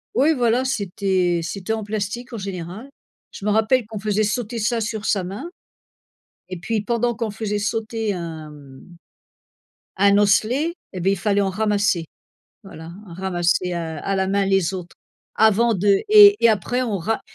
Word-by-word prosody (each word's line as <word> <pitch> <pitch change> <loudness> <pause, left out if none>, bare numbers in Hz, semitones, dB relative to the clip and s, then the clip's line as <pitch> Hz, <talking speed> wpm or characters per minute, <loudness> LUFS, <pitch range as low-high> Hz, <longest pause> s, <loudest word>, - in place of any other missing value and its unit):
Oui 290 +5 +4
voilà, 240 0 +2
c'était 190 -7 0
c'était 195 +5 -4
en 220 -1 -3
plastique 215 +4 -4
en - - -4
général. 195 +3 -7 0.4
Je 200 - -9
me - - +1
rappelle 220 +4 +2
qu'on 220 -1 -7
faisait 210 0 0
sauter 230 +2 -2
ça 225 +3 0
sur 220 -1 -4
sa 195 -3 +1
main, 205 - -6 1.0
et 185 0 -6
puis 215 +6 -2
pendant 235 +2 0
qu'on 225 0 -3
faisait 210 -1 -3
sauter 220 0 -2
un 165 -3 -7
mmh 145 +3 -15 1.1
un 200 0 +5
osselet, 230 +10 +2 0.2
eh, 185 - -5
beh 190 +3 +2
il 195 - 0
fallait 200 +1 +1
en 195 - 0
ramasser. 205 -3 0 0.6
Voilà 165 -4 -11
ramasser 180 0 -1
à 165 -2 -4
à 195 0 -2
la 190 - 0
main 200 0 +1
les 195 -1 +1
autres. 175 -2 -8 0.4
Avant 220 +2 +3
de 200 0 +2
et 415 -1 +9
et - - +8
après 220 +5 -1
on 220 -6 -2
ra 220 +6 -2
205 Hz, 170 wpm, -21 LUFS, 185-225 Hz, 1.1 s, et